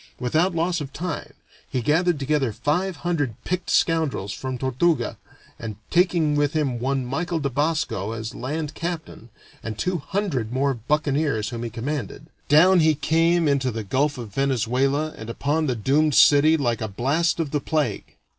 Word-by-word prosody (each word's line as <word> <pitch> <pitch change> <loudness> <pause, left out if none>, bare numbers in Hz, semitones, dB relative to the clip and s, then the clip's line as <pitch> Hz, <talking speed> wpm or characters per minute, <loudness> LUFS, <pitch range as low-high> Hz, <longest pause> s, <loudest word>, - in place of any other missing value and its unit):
Without 160 +8 +1
loss 170 0 0
of 140 -1 -6
time 165 +2 -5 0.4
he 130 - -1
gathered 165 +5 +2
together 140 -3 0
five 155 - -1
hundred 145 -10 0
picked 180 +1 -3
scoundrels 155 - +1
from 130 -1 -4
Tortuga, 130 +2 0 0.4
and 110 -2 -5 0.2
taking 170 -4 +3
with 145 +1 +1
him 140 -6 0
one 135 +1 -1
Michael 165 +7 -2
de 140 -2 -2
Basco 145 - -1
as 110 0 -5
land 150 +4 -4
captain, 165 -8 -6 0.3
and 110 -2 -5
two 180 +8 -1
hundred 140 - -2
more 135 +2 +1
buccaneers 140 -2 0
whom 115 -1 -5
he 120 - -3
commanded, 130 +3 -4 0.2
down 175 +5 +6
he 155 -1 +4
came 165 +3 +2
into 140 -2 +1
the 115 -2 -4
Gulf 140 +8 0
of 115 -5 -8
Venezuela 135 +4 0
and 110 +1 -9
upon 150 +6 0
the 125 - 0
doomed 140 +6 +2
city 150 +2 +6
like 120 -5 -1
a 110 - -1
blast 140 - 0
of 155 -4 -2
the 150 - 0
plague. 145 -10 -2
145 Hz, 165 wpm, -23 LUFS, 125-160 Hz, 0.4 s, down